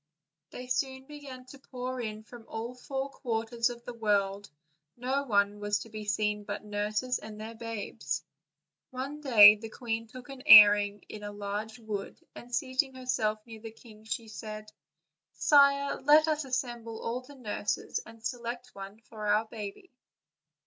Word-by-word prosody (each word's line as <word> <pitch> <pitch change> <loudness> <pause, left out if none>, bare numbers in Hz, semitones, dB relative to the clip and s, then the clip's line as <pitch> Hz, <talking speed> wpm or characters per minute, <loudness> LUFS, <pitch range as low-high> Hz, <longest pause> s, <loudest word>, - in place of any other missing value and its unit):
They 250 - -8
soon 265 +1 -2
began 275 -3 -10
to 280 - -12
pour 255 -1 -5
in 215 -1 -5
from 230 +1 -13
all 225 +2 -5
the 250 - -19
four 270 0 -3
quarters 230 -1 -1
of 240 0 -9
the 245 - -6
world; 205 -3 0 0.5
no 265 +3 -1
one 205 -3 +2
was 205 0 0
to 225 - -9
be 215 -1 -7
seen 210 0 0
but 205 +1 -6
nurses 210 +4 -1
and 215 0 -10
their 220 +1 -7
babes. 230 -2 -4 0.7
One 275 +4 -5
day 215 -6 +9
the 225 +1 -8
queen 225 -1 -4
took 250 +3 -12
an 270 -1 -9
airing 205 -4 +9
in 210 - -9
a 205 0 -6
large 205 +2 -5
wood, 215 -4 -6
and, 240 - -12
seating 260 +2 0
herself 220 -4 -1
near 225 -2 -11
the 225 - -7
king, 220 -1 -16
said: 215 -1 -6 0.6
"Sire, 280 -1 +4
let 300 +3 +6
us 305 -2 0
assemble 240 -3 -3
ail 240 +2 -2
the 285 +3 -14
nurses 205 -3 -2
and 225 0 -14
select 240 0 -5
one 195 +2 -10
for 215 -2 -7
our 210 +2 +3
baby." 215 - -8
225 Hz, 165 wpm, -30 LUFS, 210-255 Hz, 0.7 s, day